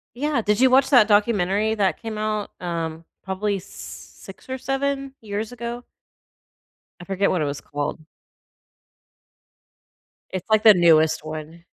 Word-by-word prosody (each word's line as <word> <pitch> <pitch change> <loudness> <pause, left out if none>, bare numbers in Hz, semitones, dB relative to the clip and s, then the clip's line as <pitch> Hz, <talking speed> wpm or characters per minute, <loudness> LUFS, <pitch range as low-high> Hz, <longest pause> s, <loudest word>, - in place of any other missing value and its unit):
Yeah 290 -2 0
did 210 +1 +1
you 260 0 +5
watch 265 +1 +4
that 245 -6 +6
documentary 205 0 +2
that 200 0 0
came 220 -2 -5
out, 215 -1 -2
um, 165 -2 -4 0.2
probably 195 +1 -2
s 190 - -11
6 - - -12
or 260 - -3
7 270 +1 -2
years 215 +1 -4
ago? 240 0 -6 1.2
I - - -10
forget 195 +1 0
what 180 - 0
it - - +1
was 140 0 -4
called. 145 +2 -4 2.3
It's, 185 +1 -5
like, 215 -1 +3
the 215 -2 +9
newest 160 -3 +4
one. 155 +2 -8
210 Hz, 145 wpm, -23 LUFS, 175-235 Hz, 2.3 s, the